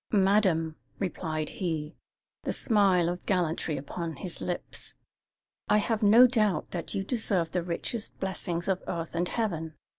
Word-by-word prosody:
"Madam," 190 -6 +3 0.2
replied 160 -5 -2
he, 160 -3 -3 0.5
the - - -2
smile 195 -6 +3
of 175 +1 -3
gallantry 165 -5 0
upon 160 +4 -5
his 175 +4 -6
lips, 175 - -5 0.7
"I 210 - +5
have 220 +1 0
no 220 +4 +8
doubt 215 -6 +1
that 175 +3 -4
you 195 - 0
deserve 195 -7 0
the 180 - 0
richest 180 +6 -3
blessings 175 -3 -2
of 190 -2 +1
earth 165 -1 -3
and 175 +1 0
heaven. 165 -9 -2
180 Hz, 145 wpm, -29 LUFS, 165-205 Hz, 0.7 s, no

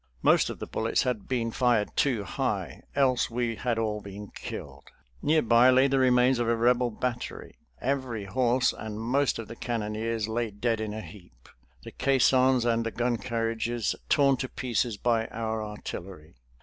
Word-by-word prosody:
Most - - +4
of - - -5
the - - -6
bullets 110 +1 0
had 125 -6 -2
been 120 -3 -1
fired 120 -4 +1
too 125 -7 +1
high, 90 - -3
else 130 -3 +2
we 120 -1 -1
had 120 0 -1
all 105 -2 -1
been 100 +1 -9
killed. - - -8 0.4
Near 155 +1 +3
by 120 +2 +6
lay 130 +1 +5
the 135 0 +1
remains 125 0 +4
of 120 - 0
a 115 - +3
Rebel 120 +1 +3
battery. 120 +2 -5 0.2
Every 130 -6 -2
horse 120 +4 +2
and 110 -1 -6
most 130 +5 +1
of 115 - -6
the 115 - -8
cannoneers 110 -1 -2
lay 115 +1 -1
dead 110 +2 -1
in 105 -1 -4
a 110 - -4
heap, 90 - -14 0.4
the - - -9
caissons 130 -2 +3
and 115 -1 +2
the 115 - -2
gun 120 +1 -1
carriages 115 -1 -2
torn 140 -2 +4
to 130 - -4
pieces 120 -3 -1
by 115 0 +1
our 110 -1 -3
artillery. 95 -6 -8
115 Hz, 175 wpm, -27 LUFS, 110-125 Hz, 0.4 s, by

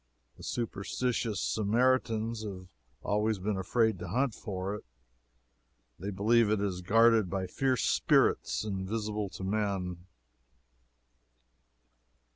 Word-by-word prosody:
The - - -16
superstitious 115 0 -2
Samaritans 115 0 +1
have 95 -3 -6 0.4
always 105 +1 +1
been 100 +2 -2
afraid 110 +2 +1
to - - -6
hunt 130 -1 0
for 95 -3 -4
it. 105 - -6 1.2
They 100 - -4
believe 105 +3 +3
it 110 -1 +2
is 95 -3 -2
guarded 115 +1 +4
by 95 0 -2
fierce 130 +6 0
spirits - - +2
invisible 105 +1 -3
to 95 +1 -8
men. 95 -3 -2
105 Hz, 105 wpm, -30 LUFS, 95-115 Hz, 1.2 s, guarded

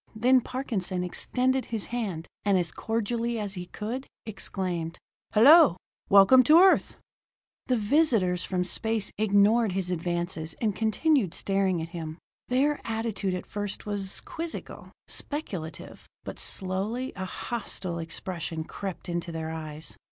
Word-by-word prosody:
Then 250 +4 +4
Parkinson 205 -9 -3
extended 255 +8 0
his 225 -3 -3
hand, 195 -9 -3 0.2
and 200 -2 +3
as 170 -3 0
cordially 230 +1 -2
as 205 -3 -3
he 180 -2 -6
could, 235 +8 -5 0.2
exclaimed: 180 -5 -3 0.3
"Hello! 270 - +7 0.3
Welcome 200 +6 +8
to 310 +6 +7
Earth!" 375 +2 +5 0.7
The 255 - +2
visitors 210 - +3
from 180 -1 -1
space 220 +2 -1
ignored 215 +1 +4
his 185 -1 -1
advances 170 -2 -2
and 215 -4 -1
continued 225 - +1
staring 195 -4 0
at 165 - -7
him. 160 -2 -6 0.3
Their 280 +4 +1
attitude 220 -4 -2
at 180 - -5
first 205 -1 -5
was 200 -2 -2
quizzical, 330 0 -7 0.2
speculative, 190 - -5 0.2
but - - -7
slowly 200 +7 -1
a 190 - -4
hostile 185 -4 -4
expression 165 0 -4
crept 190 +2 -6
into 170 0 -3
their 160 -1 -4
eyes. 155 -1 -6
200 Hz, 130 wpm, -27 LUFS, 180-235 Hz, 0.7 s, Welcome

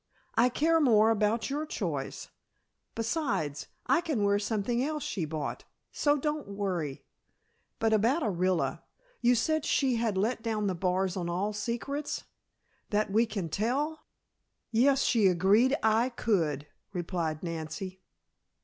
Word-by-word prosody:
I 235 +2 +4
care 320 +5 +2
more 225 -5 +5
about 220 +3 +1
your 295 +2 -1
choice. - - -4 0.7
Besides, 210 - -1 0.2
I - - +3
can 300 -11 -1
wear 200 0 +3
something 220 +3 0
else 300 +1 -2
she 180 -6 -2
bought, 155 -1 -4 0.3
so 290 0 +2
don't 300 -1 -2
worry. 185 -8 -3 0.7
But 225 0 +2
about 235 +9 +3
Orilla. 185 -4 0 0.4
You 245 +1 +4
said 315 +6 +1
she 260 -5 +2
had 225 -4 0
let 225 +4 0
down 215 -2 -1
the 190 - +1
bars 185 +1 0
on 175 -2 -2
all 195 +5 -1
secrets? 240 +7 -3 0.7
That 210 -1 0
we 225 +3 +3
can 200 -5 -3
tell?" 270 - -1 0.7
"Yes, 265 +4 +4
she 220 -5 +4
agreed 200 +9 +4
I 225 +3 +3
could," 165 - 0 0.3
replied 170 -3 -2
Nancy. 175 +3 -5
215 Hz, 135 wpm, -29 LUFS, 185-250 Hz, 0.7 s, more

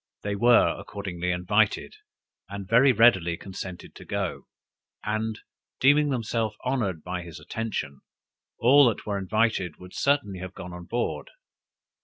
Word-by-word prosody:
They 100 0 -2
were 120 +3 +4
accordingly 90 -4 -5
invited, 95 +4 +1 0.5
and 100 -1 -7
very 125 +6 +6
readily 95 -8 +4
consented 95 -1 -8
to - - -12
go: - - -4 0.6
and 110 0 -2 0.4
deeming 145 +2 +5
themselves 115 -4 -1
honored 105 - -1
by 90 0 -4
his 85 -3 -10
attention, 75 -5 -4 0.6
all 135 +2 +6
that 115 - -5
were 100 -2 -2
invited, 100 -4 0
would 90 0 -13
certainly 140 -10 0
have 95 +1 -8
gone 90 -1 -8
on 90 0 -9
board. 120 +6 -3
105 Hz, 135 wpm, -26 LUFS, 90-115 Hz, 0.6 s, very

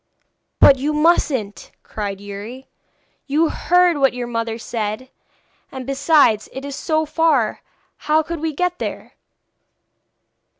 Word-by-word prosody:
'But 275 -2 +7
you 295 +3 -1
mustn't,' 290 -9 0
cried 200 -2 -5
Youri. 205 +6 -9 0.6
'You 310 +3 +2
heard 355 -3 +2
what 270 -2 +2
your 245 -1 -4
mother 230 -1 -3
said. 225 +2 -5 0.6
And, 260 -2 -7
besides, 275 -5 +3
it 265 +1 -7
is 280 -1 -6
so 315 +1 -1
far; 300 -8 +1 0.4
how 310 +1 +1
could 335 +1 -5
we 320 +1 -2
get 355 +4 -2
there?' - - -6
275 Hz, 125 wpm, -20 LUFS, 230-315 Hz, 0.6 s, But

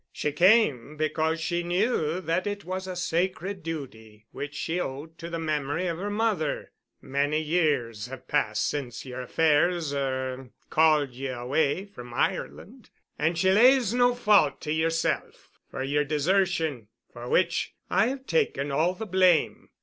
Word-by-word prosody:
She 150 - -2
came 155 - +3
because 160 +1 0
she 175 +2 -1
knew 175 -2 0
that 170 +3 -1
it 205 0 -4
was 185 +1 -4
a 185 - -5
sacred 180 +2 -2
duty 110 -10 -8
which 145 +1 -6
she 165 +4 -2
owed 155 +2 -6
to 170 - -6
the 170 - -3
memory 155 +1 -2
of 170 -2 -2
her 205 +2 -3
mother. 205 -8 -1 0.3
Many 145 +3 0
years 145 -9 0
have 130 0 -10
passed 110 -8 +1
since 130 -5 -4
yer 130 0 -6
affairs—er—called 145 -1 +1
ye 130 +2 -5
away 140 +8 0
from 120 -12 -11
Ireland - - -3 0.3
and 160 +3 +1
she 190 +2 +3
lays 240 +1 +5
no 245 0 +3
fault 205 - +3
to 150 - -4
yerself 165 +1 -2
for - - -4
yer 145 +2 +1
desertion, 160 - 0 0.3
for 120 0 -8
which 170 -1 +1
I 195 +4 +3
have 265 +1 -4
taken 270 - 0
all 165 +6 +1
the 220 - -5
blame. 185 -3 +2
160 Hz, 150 wpm, -27 LUFS, 140-185 Hz, 0.3 s, lays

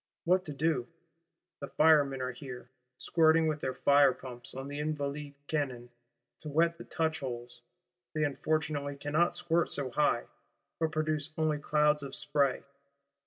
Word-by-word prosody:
What 185 +2 +3
to 150 - -3
do? 140 -4 0 0.7
The 140 - -5
Firemen 145 -5 +4
are 130 - -2
here, 125 -1 -9 0.3
squirting 160 -1 +3
with 155 -1 0
their 130 -2 -3
fire 140 0 +5
pumps 125 -2 -9
on 135 +1 -5
the 145 +1 -5
Invalides' 145 -1 -3
cannon, 130 -6 -3 0.5
to 155 - -6
wet 165 +3 +2
the - - -8
touchholes; 130 -8 -3 0.5
they 155 - +1
unfortunately 145 0 -1
cannot 150 +5 +1
squirt 170 0 +1
so 135 -3 -3
high; 135 -3 +2 0.6
but 160 -1 0
produce 155 -1 -1
only 155 -2 +1
clouds 150 0 +2
of 140 -1 -6
spray. 140 -3 +1
145 Hz, 145 wpm, -31 LUFS, 135-155 Hz, 0.7 s, fire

